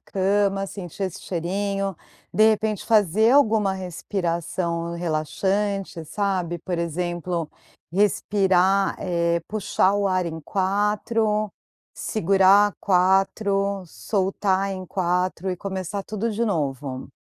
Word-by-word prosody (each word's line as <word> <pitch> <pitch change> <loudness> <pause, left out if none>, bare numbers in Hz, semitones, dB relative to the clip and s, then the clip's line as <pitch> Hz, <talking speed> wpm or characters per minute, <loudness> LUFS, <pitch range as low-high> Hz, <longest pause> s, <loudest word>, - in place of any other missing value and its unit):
cama, 195 0 0
sentir 190 -1 -7
esse 185 -3 -3
cheirinho. 195 +3 -2 0.4
De 215 +4 +5
repente, 215 -2 -1
fazer 215 0 +4
alguma 220 -8 +4
respiração 170 -2 -3
relaxante, 185 +4 -1
sabe. 185 -4 -1
Por 175 +1 -4
exemplo, 175 0 -2 0.4
respirar, 195 -1 +2
eh, 170 -2 0
puxar 200 -2 +1
o 205 -1 +1
ar 185 -1 +1
em 160 -1 -5
4, 210 +4 0 0.4
segurar 200 0 +4
4, 195 +1 +2
soltar 195 +1 -1
em 185 -1 -6
4, 180 0 -1
e 180 - -3
começar 190 +1 -4
tudo 215 +3 -3
de 220 +2 -2
novo. 140 - -2
190 Hz, 105 wpm, -24 LUFS, 175-205 Hz, 0.4 s, De